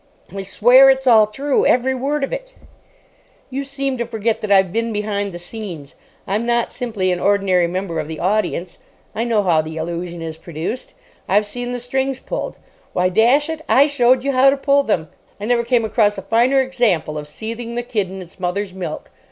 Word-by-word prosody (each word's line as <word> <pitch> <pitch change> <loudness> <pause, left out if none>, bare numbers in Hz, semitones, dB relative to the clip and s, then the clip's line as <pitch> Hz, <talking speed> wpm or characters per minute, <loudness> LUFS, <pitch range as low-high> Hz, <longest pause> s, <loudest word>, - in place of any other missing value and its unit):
"I 195 - -3
swear 245 +7 +6
it's 265 0 +2
all 220 -4 +6
true. 275 +6 0
Every 255 +2 +3
word 275 +3 -1
of 275 - -2
it." - - -6 1.0
"You 275 +2 -3
seem 275 -2 -3
to 235 - -2
forget 225 -1 -1
that 215 - -3
I've 190 -2 +4
been 230 0 -1
behind 205 -1 -2
the 175 - -7
scenes. 175 -6 -8 0.3
I'm 205 +4 -1
not 235 0 0
simply 210 -7 -2
an 180 - -1
ordinary 195 -3 +2
member 175 -2 -3
of 155 - -4
the 160 -1 -6
audience. 185 -2 -1 0.3
I 230 - -2
know 225 -3 +1
how 170 -4 +3
the 160 +1 -7
illusion 170 +1 -4
is 160 -1 -6
produced. 165 +8 -6 0.3
I've 205 +2 +3
seen 245 +4 -5
the 245 - -2
strings 265 +2 -1
pulled. - - -5 0.4
Why, 180 0 +2
dash 240 - +3
it, 320 -1 -5
I 275 - +6
showed 255 -3 +3
you 280 - 0
how 265 +1 +5
to 275 - +1
pull 280 +1 +3
them. 180 - -1 0.3
I 205 - -5
never 235 +1 +2
came 235 -1 +1
across 210 -2 +2
a - - -6
finer 245 +4 +3
example 235 - 0
of 150 -1 -5
seething 230 +7 -6
the 240 - -2
kid 210 -6 -2
in 190 0 -7
its 175 +2 -18
mother's 185 +2 -2
milk. 175 -5 -6
220 Hz, 200 wpm, -19 LUFS, 185-255 Hz, 1.0 s, swear